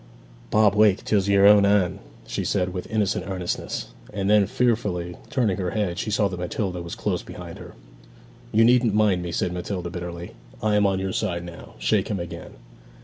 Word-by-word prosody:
'Bob, 105 -2 +4
wake; 105 -2 +4
'tis 100 -2 +1
your 100 0 +5
own 105 0 +8
Anne!' 100 -3 +2 0.3
she - - -3
said, 90 -2 0
with 90 - -5
innocent 105 -4 0
earnestness; 90 -3 -3 0.2
and 100 -1 -1
then, 105 -2 +5
fearfully 105 -8 0
turning 110 -8 +1
her 90 -2 -2
head, 95 -4 -2
she - - -2
saw 105 -1 +2
that 90 -2 -6
Matilda 90 0 -3
was 85 0 -6
close - - -2
behind - - -9
her. - - -11 0.8
'You 110 +1 +4
needn't 120 -3 +4
mind 105 -4 +3
me,' 85 -1 -4
said 90 +1 -1
Matilda 90 -1 -4
bitterly. 85 -1 -6 0.3
'I 105 -1 +2
am 105 -1 +4
on 95 -1 +1
your 95 0 -3
side 90 -5 -2
now. 85 -1 -11
Shake - - +1
him 100 - -2
again.' 85 0 -8
100 Hz, 190 wpm, -24 LUFS, 90-105 Hz, 0.8 s, own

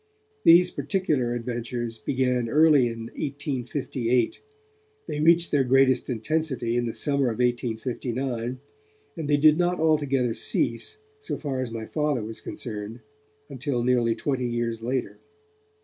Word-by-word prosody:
These 175 +2 +7
particular 140 -5 0
adventures 120 -1 -4
began 125 0 0
early 150 -2 +5
in 115 -1 -5
1858, 130 -3 -2 0.7
they 150 - -3
reached 170 +2 +4
their 145 -2 +3
greatest 130 +1 +3
intensity 130 0 -1
in 120 0 0
the - - -2
summer 140 -2 +1
of 115 -3 -1
1859, 120 +1 -2 0.6
and 160 -4 -5
they 145 - +4
did 155 +2 +5
not 175 0 +1
altogether 145 -6 +2
cease, 435 - -1 0.2
so 430 - -4
far 135 -4 -3
as 130 - -3
my 115 -1 -5
Father 150 -3 -1
was 110 +1 -7
concerned, 110 0 -7 0.5
until 130 -2 -2
nearly 120 -2 +2
twenty 130 -3 -1
years 120 -1 -2
later. 125 +2 -3
125 Hz, 135 wpm, -25 LUFS, 120-145 Hz, 0.7 s, These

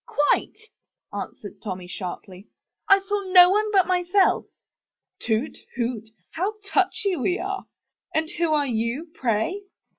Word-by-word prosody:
"Quite," 295 0 +1 0.6
answered - - -7
Tommy 185 -4 -5
sharply, 185 +1 -7 0.4
"I 390 - +8
saw 405 +1 -2
no 360 -1 +9
one 425 +2 +1
but 385 -3 +4
myself. 365 +1 +2 0.8
"Hoot! 225 +5 -1 0.2
toot! 230 -3 -3 0.2
How 385 +6 -2
touchy 395 -1 +1
we 355 +5 0
are! 390 +1 -4 0.4
And 315 0 0
who 340 -2 0
are 295 -2 +3
you, 245 +6 -2
pray? 250 - -1
325 Hz, 125 wpm, -24 LUFS, 230-385 Hz, 0.8 s, no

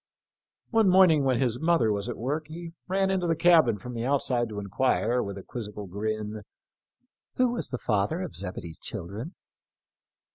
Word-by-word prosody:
One 225 -4 +4
morning 180 -6 +6
when 130 -2 +2
his 125 -2 0
mother 160 -9 +3
was 100 +3 -2
at 120 - -4
work 150 +6 -2
he 165 +1 -8
ran 195 +1 +1
into 185 -2 0
the 165 - +2
cabin 160 - +5
from 125 +5 -8
the 115 -1 -3
outside 125 -3 +1
to 105 - -7
enquire, 115 +4 +1
with 100 0 -5
a 95 - -8
quizzical 105 -3 -7
grin, 105 +2 -4 0.5
" 250 - -52
Who 255 -1 +3
was 240 - -3
the 125 - -3
father 110 - 0
of 180 - -6
Zebedee's 90 -4 -5
children 105 - -6
125 Hz, 175 wpm, -27 LUFS, 105-165 Hz, 0.5 s, morning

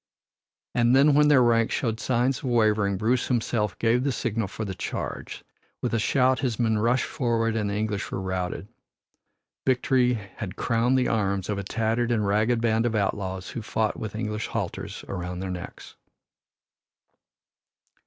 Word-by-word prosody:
And 120 +1 +3
then 140 +2 +6
when 150 +1 +5
their 140 -4 +6
ranks 115 -1 +3
showed 115 -3 -1
signs 125 +1 +1
of - - -9
wavering, 110 -5 +2
Bruce 115 +5 +1
himself 110 -4 0
gave 120 +2 +2
the 140 - +1
signal 115 -3 -2
for 110 +3 -5
the 95 - -4
charge. 95 - -5 0.4
With - - -1
a 115 - +2
shout 130 +3 +2
his 125 -6 -1
men 110 -2 +1
rushed 120 +4 +2
forward 115 -3 0
and 105 -2 0
the 100 - -2
English 105 -1 -2
were - - -2
routed. 95 0 -3 1.0
Victory 125 -1 +2 0.2
had 95 -3 -5
crowned 120 +2 +1
the 130 - +2
arms 100 -3 0
of 105 -1 -1
a - - -3
tattered 115 +3 0
and 110 -3 +1
ragged 110 +4 +2
band 115 0 +2
of 115 - -1
outlaws 95 -2 -2
who 120 - -5
fought 110 0 -1
with 110 -1 -5
English 110 -1 -3
halters - - -4
around 90 -1 -4
their 95 0 -4
necks. 90 -1 -8
115 Hz, 165 wpm, -26 LUFS, 105-120 Hz, 1.0 s, then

